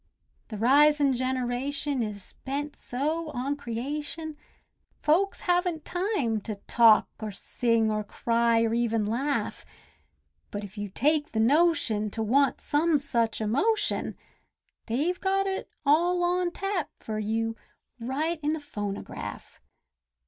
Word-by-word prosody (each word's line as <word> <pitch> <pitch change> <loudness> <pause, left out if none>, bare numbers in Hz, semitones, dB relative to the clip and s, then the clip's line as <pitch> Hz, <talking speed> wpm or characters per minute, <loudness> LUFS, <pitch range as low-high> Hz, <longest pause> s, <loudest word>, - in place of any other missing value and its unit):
The 215 - -6
risin' 285 +4 +5
generation 260 +2 -1
is 210 -3 -5
bent 285 +2 -3
so 305 +6 -2
on 265 +4 -1
creation, 295 +5 -4 0.7
Folks 370 +6 +2
haven't 355 -3 0
time 350 - -1
to 215 0 -5
talk 220 +2 +5
or 215 - -3
sing 225 +2 0
or 215 0 -1
cry 230 +2 +2
or 225 0 +1
even 230 -2 +1
laugh. 265 +7 -1 0.9
But 205 0 -5
if 200 +1 -9
you 205 -1 -4
take 295 +8 +1
the 220 - 0
notion 255 -5 +3
to 225 - 0
want 270 +5 +2
some 310 +2 +2
such 235 -6 0
emotion, 410 - 0 0.7
They've 300 +11 0
got 390 0 +1
it 385 0 -3 0.2
all 350 +5 +3
on 355 0 +1
tap 390 -2 -2
fur 215 -1 -4
you, 225 +1 -1 0.4
right 300 +8 -2
in 300 +1 +1
the 315 - -2
phonograph. 205 -9 -6
270 Hz, 125 wpm, -27 LUFS, 225-315 Hz, 0.9 s, risin